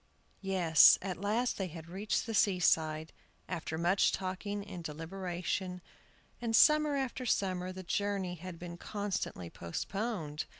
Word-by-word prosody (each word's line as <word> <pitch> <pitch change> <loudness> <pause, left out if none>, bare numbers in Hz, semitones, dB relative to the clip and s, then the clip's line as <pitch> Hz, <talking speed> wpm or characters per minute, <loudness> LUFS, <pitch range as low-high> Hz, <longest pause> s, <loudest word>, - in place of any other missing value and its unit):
YES, 180 -5 +6
at 185 -1 -4
last 220 +5 0
they 190 - -1
had 165 -1 -9
reached 195 +5 -1
the 225 - -4
seaside, 160 -6 +2 0.3
after 165 -2 -4
much 175 +4 +3
talking 200 +2 -3
and 180 -4 -8
deliberation, 180 +3 -4 0.6
and 230 -1 0
summer 300 +2 +6
after 265 -2 -2
summer 185 -5 0
the 185 0 -8
journey 195 -1 -1
had 180 0 -8
been 175 0 -8
constantly 200 - -3
postponed. 160 - -4
185 Hz, 130 wpm, -32 LUFS, 170-205 Hz, 0.6 s, YES